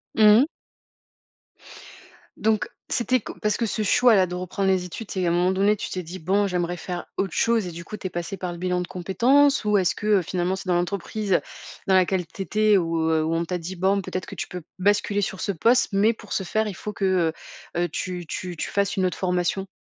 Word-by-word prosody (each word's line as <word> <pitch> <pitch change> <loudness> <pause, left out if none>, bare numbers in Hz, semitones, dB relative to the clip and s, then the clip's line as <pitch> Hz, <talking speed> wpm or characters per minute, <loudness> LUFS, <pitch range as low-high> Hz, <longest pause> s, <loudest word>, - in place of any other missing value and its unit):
Mmh 215 0 +7
mh. 295 - +1 1.9
Donc, 215 -3 +1 0.2
c'était 255 +1 +2
que - - -8
parce 210 0 +1
que 235 - 0
ce 215 +1 -2
choix-là, 210 -2 +5
de 180 - -7
reprendre 185 +2 -1
les 185 -1 +1
études, 195 +5 -8
c'est 185 -2 -1
à - - +2
un - - +1
moment 180 +2 +2
donné, 200 +3 +3
tu - - -5
t'es 185 - -3
dit: 175 +3 -8
«Bon, 195 +5 +1
j'aimerais 175 -1 -1
faire 180 0 -5
autre 195 -3 -1
chose», 230 -4 +2
et 175 - -5
du 170 +1 -8
coup, 215 - -7
tu 190 - -4
es - - -6
passée 175 +3 -5
par 180 0 -4
le 175 - -7
bilan 180 0 -1
de 175 - -5
compétences? 245 +11 +3
Ou 210 -1 +3
est-ce 185 -2 +2
que, 210 - -5
heu, 205 -3 +4
finalement, 180 +2 -1
c'est 190 - -8
dans 180 - +2
l'entreprise 195 +2 0 0.5
dans 190 - +3
laquelle 185 -1 +2
tu 195 - -9
étais 210 +2 +3
ou 165 -2 0
heu, 160 -1 +2
où 160 +1 0
on 170 +1 0
t'a 180 +1 -2
dit: 175 +2 -6
«Bon, 190 +2 +2
peut-être 185 -1 -4
que - - -9
tu - - -4
peux 180 -1 -7 0.2
basculer 205 +1 +2
sur 190 -1 -3
ce - - 0
poste, 230 +8 +3
mais 205 +3 +3
pour 215 -2 -9
ce 190 - 0
faire, 215 +4 0
il 200 - -5
faut 210 +3 -6
que, 185 -5 +1 0.4
heu 175 - +1
heu, 175 - -1
tu 180 -1 -4
tu 175 +2 -5
tu - - -3
fasses 200 0 0
une 185 - +2
autre 180 - -1
formation»? 180 +1 -1
190 Hz, 240 wpm, -24 LUFS, 180-205 Hz, 1.9 s, Mmh